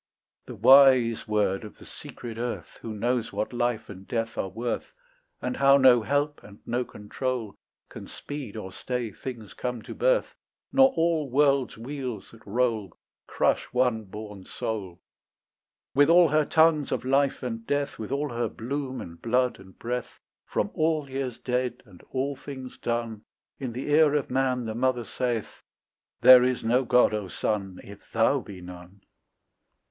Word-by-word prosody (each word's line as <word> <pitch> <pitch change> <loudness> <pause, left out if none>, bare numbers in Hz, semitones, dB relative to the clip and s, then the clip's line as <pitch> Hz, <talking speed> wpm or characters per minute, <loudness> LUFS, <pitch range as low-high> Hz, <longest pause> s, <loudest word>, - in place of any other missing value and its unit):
The - - -7
wise 130 -5 +6
word 105 -2 +1
of 105 - -10
the - - -14
secret 115 -2 -9
earth 120 0 -5
Who 115 - -6
knows 120 +2 -1
what 110 - -3
life 120 -2 -1
and 95 -1 -11
death 115 -1 -2
are 95 - -2
worth, 115 +5 -4 0.5
And 125 - -2
how 140 0 +6
no 130 -3 +6
help 145 +5 -1
and 100 0 -14
no 120 +2 -1
control 115 0 -4 0.3
Can - - -10
speed 140 -7 -7
or 95 -3 -6
stay 125 +2 -4
things 115 -2 -8
come 125 -3 -4
to - - -8
birth, - - +1 0.4
Nor 265 -1 +6
all 165 - +1
worlds' 140 -1 +2
wheels 125 -3 -6
that 115 - -16
roll 110 -4 -1 0.3
Crush - - +1
one 125 -3 +1
born 105 -1 -9
soul. 95 -4 -5 0.9
With 145 +2 +5
all 170 -1 +7
her 155 +1 +3
tongues 160 -2 +3
of - - -2
life 135 +1 +1
and 115 -2 -5
death, 145 0 -1
With 110 +2 -6
all 145 +2 -1
her 120 -2 -2
bloom 130 +4 -4
and 85 0 -10
blood 125 0 +1
and 95 0 -16
breath, 125 +1 -4 0.3
From - - -1
all 155 -2 0
years 130 -3 -3
dead 125 -1 -2
and 95 -5 -17
all 135 +2 -2
things 130 -2 -9
done, 115 -2 -2 0.4
In 130 -3 -4
the 130 +4 -4
ear 150 -1 +5
of 145 - -1
man 130 -2 +1
the 110 - -3
mother 125 +1 0
saith, 120 -1 -3 0.6
"There 130 -1 +9
is 125 0 0
no 125 +3 +2
God, 125 -1 +4
O 105 -2 -2
son, 95 0 -3
If 100 0 -14
thou 115 +5 +3
be 100 -7 -10
none." 90 +2 -12
125 Hz, 165 wpm, -26 LUFS, 110-135 Hz, 0.9 s, There